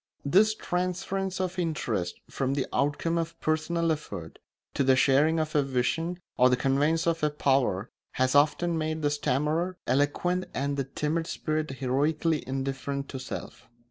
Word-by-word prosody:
This 210 +9 +4
transference 185 +1 -2
of 185 -1 -2
interest 115 - -2
from 135 0 -1
the 135 - 0
outcome 145 +4 +1
of 165 0 -3
a - - -26
personal 160 +1 +1
effort 90 - -5 0.3
to - - +1
the 130 0 +5
sharing 145 +5 +4
of 155 -1 -2
a 150 - +4
vision 140 +6 -1 0.2
or 125 +1 +6
the 125 - +3
conveyance 145 +5 +2
of 165 -1 +1
a 150 - +4
power 135 -8 +1 0.2
has 130 0 +1
often 160 +4 +3
made 155 0 -2
the 145 - +2
stammerer 150 +6 0
eloquent 145 +7 +1
and 140 +1 -1
the 135 -1 -1
timid 150 +4 -2
spirit 155 0 -2
heroically 145 +4 0
indifferent 135 +1 -3
to 130 - -5
self. 130 - -7
150 Hz, 160 wpm, -28 LUFS, 135-165 Hz, 0.3 s, or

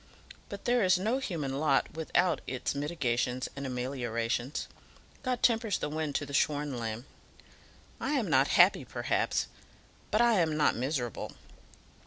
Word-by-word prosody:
But 200 -1 -8
there 245 -2 +3
is 185 -1 +5
no 220 +8 0
human 150 - -3
lot 145 -3 +2
without 170 +3 +1
its 125 -1 -2
mitigations 130 -4 -1
and 140 0 -4
ameliorations. 125 0 -2 0.5
God 255 -3 -2
tempers 225 -4 +3
the 150 - -3
wind 155 -2 -3
to 145 - 0
the 140 - -9
shorn 145 -1 +1
lamb. 115 +1 -4 0.9
I - - -1
am - - +1
not - - +4
happy, - - +6
perhaps; - - 0 0.6
but 215 - +1
I 235 -4 +5
am 160 -3 +1
not 150 - +3
miserable. 125 -1 -3
145 Hz, 145 wpm, -30 LUFS, 125-185 Hz, 0.9 s, happy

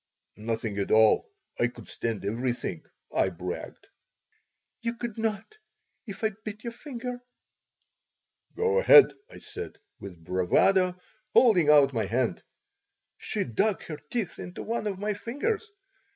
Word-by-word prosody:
"Nothing 110 -1 -3
at 100 - -1
all. 110 - +5 0.3
I 120 - +4
could 120 - -12
stand 115 -4 -3
everything," 120 -5 -2 0.3
I 95 - +2
bragged 90 0 -7 1.0
"You 230 0 -2
could 235 -2 -5
not, 220 - -3 0.5
if 200 +1 -8
I 220 - +2
bit 215 0 -6
your 235 -1 -5
finger." 250 -2 -6 1.3
"Go 455 +1 +2
ahead!" 485 -3 +8 0.2
I - - -12
said, 425 +1 -7 0.2
with 90 -4 -10
bravado, 180 - +2 0.4
holding 185 - +6
out 145 -2 +6
my 115 -3 0
hand. 120 +3 0 0.8
She - - -2
dug 195 - 0
her 155 - -6
teeth 225 -8 -3
into 180 - -7
one 225 -1 -2
of 195 -2 -2
my 210 +2 -1
fingers. 415 - -3
195 Hz, 135 wpm, -28 LUFS, -, 1.3 s, ahead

